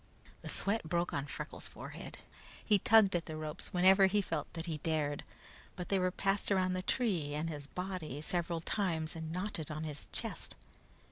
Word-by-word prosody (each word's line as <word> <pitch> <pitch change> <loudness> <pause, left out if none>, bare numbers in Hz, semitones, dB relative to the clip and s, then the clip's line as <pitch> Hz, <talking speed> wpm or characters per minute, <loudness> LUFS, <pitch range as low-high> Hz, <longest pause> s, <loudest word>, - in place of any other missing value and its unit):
The - - -6
sweat 205 +3 +3
broke 175 +1 +1
on 140 +1 -1
Freckles' - - -4
forehead. - - -8 0.5
He 205 -2 +5
tugged 210 -2 +6
at 170 - -1
the 155 -1 -4
ropes 155 0 -4
whenever 190 +2 +6
he 205 +2 +2
felt 200 - -2
that 165 -1 -4
he 160 -3 -3
dared, 150 -2 0 0.5
but 180 -2 -5
they 195 - +3
were 185 0 +3
passed 195 +2 0
around 185 -1 +3
the 185 - -1
tree 180 - 0
and 160 +2 -1
his 145 -2 -6
body 180 -5 -4
several 170 0 0
times, 165 -5 -1
and 160 -1 -5
knotted 180 -3 -3
on 155 0 -4
his 150 -2 -2
chest. - - -4
175 Hz, 185 wpm, -34 LUFS, 155-190 Hz, 0.5 s, tugged